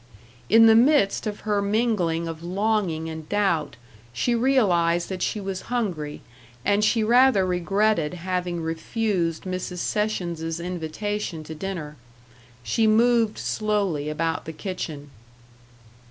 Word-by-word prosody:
In 225 +1 +7
the 225 - +8
midst 235 -4 +3
of 210 -1 -5
her 210 -2 0
mingling 200 -6 0
of 165 -1 -6
longing 185 -3 -1
and 160 -1 -7
doubt 170 - 0 0.4
she 240 - 0
realized 185 -10 +2
that 185 -2 -5
she 215 - -1
was 195 -2 -4
hungry, 180 -12 -2 0.4
and 205 +1 +2
she 220 +1 +3
rather 240 -3 +5
regretted 180 -1 +1
having 180 -1 -3
refused 165 +1 -1
Mrs. 185 -1 -4
Sessions's 170 -5 -2
invitation 180 +1 -4
to 160 - -8
dinner. 155 -3 -6 0.7
She 220 - +1
moved 230 0 +3
slowly 200 -9 -1
about 160 +2 -2
the 160 - -6
kitchen. 155 -5 -6
185 Hz, 125 wpm, -24 LUFS, 165-215 Hz, 0.7 s, the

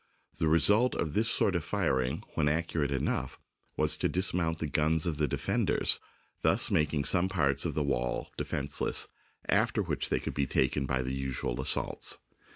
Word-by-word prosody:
The 80 - +1
result 105 +10 +4
of 80 -3 -2
this 115 +2 +1
sort 95 - +1
of 85 - -1
firing, 65 -11 -1
when 75 -2 +1
accurate 80 -2 -1
enough, 70 -2 -2 0.4
was 75 0 +2
to - - 0
dismount 90 -3 0
the 80 - -3
guns 75 +2 +1
of 80 -4 -2
the 75 -1 +1
defenders, - - +3 0.4
thus - - +2
making 75 -2 +1
some 90 +3 +2
parts 70 -7 +1
of - - -2
the 75 - 0
wall 60 -3 -2
defenceless, 70 0 -1 0.4
after - - +2
which - - -3
they - - +1
could - - -5
be 70 -2 -1
taken 70 +1 0
by 65 -1 0
the 65 +1 -3
usual 65 -2 -3
assaults. - - +1
75 Hz, 170 wpm, -30 LUFS, 70-85 Hz, 0.4 s, result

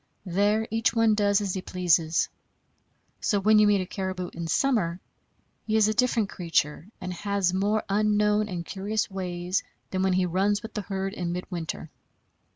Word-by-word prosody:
There 205 +4 +1
each 225 +1 +1
one 225 -1 +4
does 205 -1 +2
as 195 -3 -2
he 190 - -3
pleases. 170 -3 +2 0.9
So 205 - +1
when 215 +2 +5
you 210 - +6
meet 205 -2 +3
a - - -3
caribou 185 -1 -4
in 170 0 -5
summer, 185 - +1 0.7
he 220 - +1
is 215 -1 +5
a 215 - +1
different 240 -3 +2
creature, 165 -3 -1
and 185 0 -5
has 200 0 0
more 205 +3 +1
unknown 210 +1 +2
and 175 -3 -4
curious 205 +3 -2
ways 180 -1 -2 0.3
than 185 - -1
when 190 -1 +2
he 185 0 +2
runs 200 +4 +1
with 220 - -8
the 210 - -2
herd 195 0 -3
in 175 -5 -3
midwinter. 170 -3 -5
195 Hz, 170 wpm, -26 LUFS, 180-210 Hz, 0.9 s, you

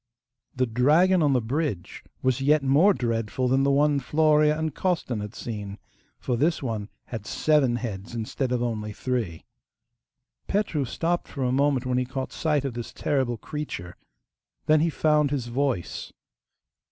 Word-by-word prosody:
The 130 0 +2
dragon 155 +10 +4
on 145 -3 +3
the 125 - +2
bridge 125 - -3 0.2
was 130 0 +1
yet 145 +1 +3
more 145 +9 +5
dreadful 115 - -1
than 130 +2 +3
the 140 - +3
one 145 +1 +3
Florea 150 +2 +3
and 160 -2 -2
Costan 155 - -1
had 105 +2 -6
seen, 105 -3 -6 0.4
for 125 - -2
this 155 +5 +1
one 110 -4 -3 0.2
had 110 -3 -5
seven 150 -6 +2
heads 110 -2 -5
instead 120 +3 -2
of 125 -1 0
only 105 -3 -3
three. 110 -10 -3 1.0
Petru 195 -8 0
stopped 170 +7 -1
for 140 - -4
a 125 - +1
moment 135 -1 +2
when 125 0 +1
he 125 - 0
caught 130 +1 -5
sight 150 -3 0
of 135 - -2
this 120 0 -6
terrible 130 -5 -1
creature. 105 - -6 0.7
Then 155 0 +5
he 165 +2 +2
found 150 -2 +2
his 135 -4 -2
voice. 120 -6 -2
130 Hz, 160 wpm, -26 LUFS, 120-150 Hz, 1.0 s, more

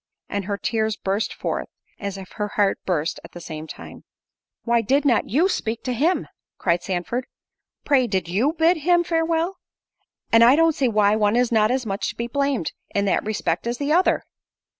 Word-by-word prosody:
And 200 -2 -3
her 200 0 -2
tears 220 0 -1
burst 200 +2 -1
forth, - - -3 0.3
as 200 -1 -4
if 190 -1 -10
her 210 -1 -3
heart 205 -2 +2
burst 165 -3 -1
at - - -13
the 175 - -8
same 160 -2 -7
time. - - -10 0.6
"Why 235 -1 +2
did 270 +6 +1
not 245 -5 +2
you 310 - +3
speak 225 - -3
to 255 - -2
him?" 315 +10 +1 0.3
cried 170 -1 +1
Sandford—"Pray 245 +6 -3
did 190 -5 -1
you 225 - +1
bid 330 +2 +3
him 345 +3 +3
farewell? 330 +2 0 0.7
and 230 0 +7
I 245 +3 +7
don't 330 +1 +4
see 270 -3 +1
why 210 -2 +3
one 210 0 +2
is 245 0 +2
not 215 -2 +3
as 255 0 0
much 195 -1 -2
to - - -6
be 235 - -3
blamed, 275 - -1 0.2
in 200 0 +2
that 195 - +1
respect, 210 -2 -2
as 240 +1 -2
the 290 +1 0
other." 360 +3 +3
230 Hz, 190 wpm, -23 LUFS, 200-285 Hz, 0.7 s, and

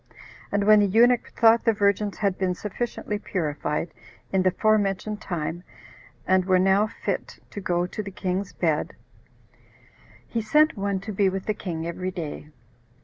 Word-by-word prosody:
And 205 0 +1
when 215 +1 +7
the 205 - +4
eunuch 235 +4 +3
thought 230 0 +5
the 225 - +3
virgins 200 0 +1
had 200 -3 0
been 185 -1 -1
sufficiently 210 +1 -4
purified, 155 -3 -3 0.4
in 190 - +3
the 185 - +4
fore 215 +3 +3
mentioned 205 +2 -2
time, 170 0 -4 0.6
and 185 0 +3
were 185 -1 +4
now 195 +3 +3
fit - - -4
to 205 - -6
go 175 -1 0
to 180 - -5
the 200 - -7
king's 185 0 -3
bed, 160 -2 -1 1.3
he 230 - -3
sent 300 +8 +3
one 200 -1 -1
to 215 - -6
be 195 -1 +2
with 190 0 -4
the 215 - 0
king 170 -6 -5
every 180 +2 -3
day. 160 -4 -6
195 Hz, 165 wpm, -25 LUFS, 180-210 Hz, 1.3 s, when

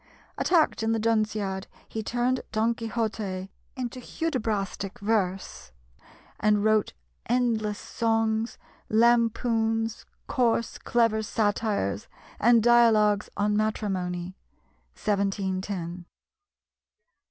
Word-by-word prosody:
Attacked 330 -9 +2
in 225 0 +1
the 225 - 0
Dunciad, 215 -3 0 0.2
he 220 - -4
turned 245 +3 0
Don 225 +2 +2
Quixote 215 -5 -3 0.2
into 255 -1 -4
Hudibrastic 220 - -3
verse, 190 - -2 0.7
and 210 -1 +3
wrote 215 -1 +2 0.3
endless 225 -4 +1
songs, 225 0 0 0.3
lampoons, 225 -1 +2 0.2
coarse 235 -3 0
clever 230 -2 +2
satires, 205 - -1 0.3
and 230 0 +5
Dialogues 220 -3 +4
on 210 +1 +1
Matrimony 185 -4 -2 0.6
(1710). 190 -3 -2
220 Hz, 85 wpm, -27 LUFS, 200-230 Hz, 0.7 s, and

